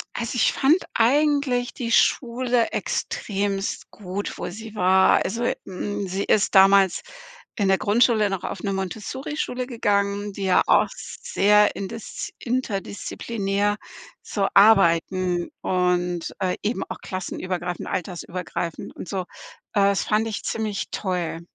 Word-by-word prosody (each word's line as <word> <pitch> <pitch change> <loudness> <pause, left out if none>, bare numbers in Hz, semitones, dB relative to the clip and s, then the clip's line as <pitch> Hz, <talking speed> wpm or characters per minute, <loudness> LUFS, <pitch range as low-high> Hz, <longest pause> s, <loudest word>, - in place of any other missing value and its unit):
Also 235 +1 -3
ich 245 - +3
fand 285 +4 +4 0.2
eigentlich 270 0 +2
die 230 -2 -4
Schule 240 -1 +2
extrem 200 -1 -2
gut, 200 0 -5
wo - - -4
sie 220 +4 -9
war. 190 0 +4
Also, 235 +5 -1
hm, 205 +2 -4
sie 190 +2 -2
ist 210 - +2
damals 195 -1 +6 0.6
in 205 -3 +1
der 190 - +4
Grundschule 215 0 +3
noch 195 -2 -3
auf - - -5
'ne 200 -2 -2
Montessorischule 245 +7 -4
gegangen, 205 -3 0
die 195 0 -4
ja 185 - +4
auch - - +5
sehr 210 - +2
indis 200 +3 -6
interdisziplinär 205 -3 -2 0.4
so 200 -2 -1
arbeiten 185 -3 +4
und, 180 -1 0
äh, 185 -1 0
eben 220 +4 -1
auch - - -5
klassenübergreifend, 180 -1 -4
altersübergreifend 175 -2 -4
und - - -8
so. 190 +1 -2
Äh, - - -8 0.7
das 200 - 0
fand 215 +1 +1
ich 220 - -4
ziemlich 215 -2 -2
toll. 180 -4 -2
200 Hz, 130 wpm, -24 LUFS, 185-225 Hz, 0.7 s, damals